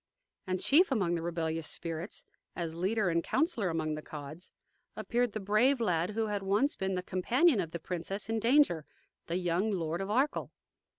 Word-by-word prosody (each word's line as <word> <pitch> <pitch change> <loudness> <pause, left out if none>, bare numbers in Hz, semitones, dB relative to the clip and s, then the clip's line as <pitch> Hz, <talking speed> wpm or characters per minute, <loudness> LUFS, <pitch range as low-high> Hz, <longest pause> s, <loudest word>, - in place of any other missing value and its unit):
And 185 0 -1
chief 315 - +4
among 195 -9 +1
the 170 - -1
rebellious 165 -1 -2
spirits, 165 +3 -4 0.3
as 170 -2 -3
leader 190 +4 0
and 170 0 +1
counsellor 280 - +1
among 160 -2 -1
the 155 - -4
Cods, 150 +3 -9 0.4
appeared 240 -2 0
the 215 - -2
brave 215 +7 +3
lad 180 -2 0
who 225 0 +1
had 205 -2 -2
once 205 +9 +1
been 190 0 -2
the 180 - -2
companion 240 - +3
of 170 -4 -1
the 170 - -4
princess 185 +4 -4
in 225 0 0
danger, 235 - +4 0.4
the 170 - -1
young 180 +3 0
Lord 170 -3 -2
of 195 - -4
Arkell. 265 +7 +1
190 Hz, 180 wpm, -31 LUFS, 170-225 Hz, 0.4 s, chief